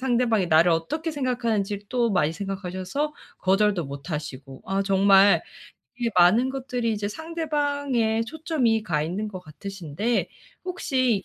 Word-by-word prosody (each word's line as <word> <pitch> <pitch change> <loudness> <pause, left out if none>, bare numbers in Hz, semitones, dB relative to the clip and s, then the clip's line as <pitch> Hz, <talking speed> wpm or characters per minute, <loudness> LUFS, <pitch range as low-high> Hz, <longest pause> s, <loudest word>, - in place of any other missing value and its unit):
상대방이 240 -6 +2
나를 165 +2 +5
어떻게 235 - -1
생각하는지를 230 -8 -1
또 240 -2 +1
많이 165 -5 +2
생각하셔서 195 - -3 0.3
거절도 195 -2 +2
못 140 +5 -8
하시고. 135 -3 -6
아 195 +1 0
정말 195 0 +5 0.6
이 235 -1 0
많은 195 +9 +5
것들이 250 -4 -2
이제 205 -1 -2
상대방에 285 -6 -1
초점이 255 -6 0
가 155 -7 0
있는 190 +7 -3
것 185 -3 -7
같으신데 190 +6 -3 0.4
혹시 255 - 0
210 Hz, 310 characters per minute, -25 LUFS, 185-255 Hz, 0.6 s, 나를